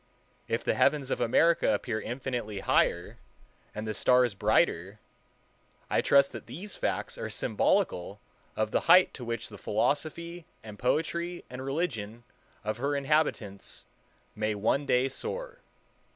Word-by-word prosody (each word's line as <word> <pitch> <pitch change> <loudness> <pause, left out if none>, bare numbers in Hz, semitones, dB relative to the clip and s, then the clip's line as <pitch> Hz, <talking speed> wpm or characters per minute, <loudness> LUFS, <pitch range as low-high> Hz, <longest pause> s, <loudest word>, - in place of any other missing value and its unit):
If - - -1
the - - +1
heavens 140 -3 +2
of - - -1
America 165 +8 +3
appear 110 -4 -3
infinitely 120 -5 -4
higher, 85 0 +1 0.6
and 110 +1 -4
the 110 - -2
stars 125 0 +3
brighter, 95 0 +1 0.9
I - - +3
trust 140 0 +4
that - - -9
these 200 +5 -8
facts - - -2
are - - -4
symbolical 90 +3 0 0.4
of 110 0 -1
the - - +2
height 185 +2 +7
to 125 - -8
which 115 -2 -4
the 105 -2 -11
philosophy 160 +9 -1 0.2
and 105 -2 -10
poetry 170 +6 -1
and 125 +1 -6
religion 125 -7 -3 0.4
of 110 +1 -2
her 140 +4 -1
inhabitants 140 -9 -1 0.5
may 105 0 -1
one 125 +7 0
day 125 +2 +3
soar. - - -5
125 Hz, 135 wpm, -29 LUFS, 110-155 Hz, 0.9 s, height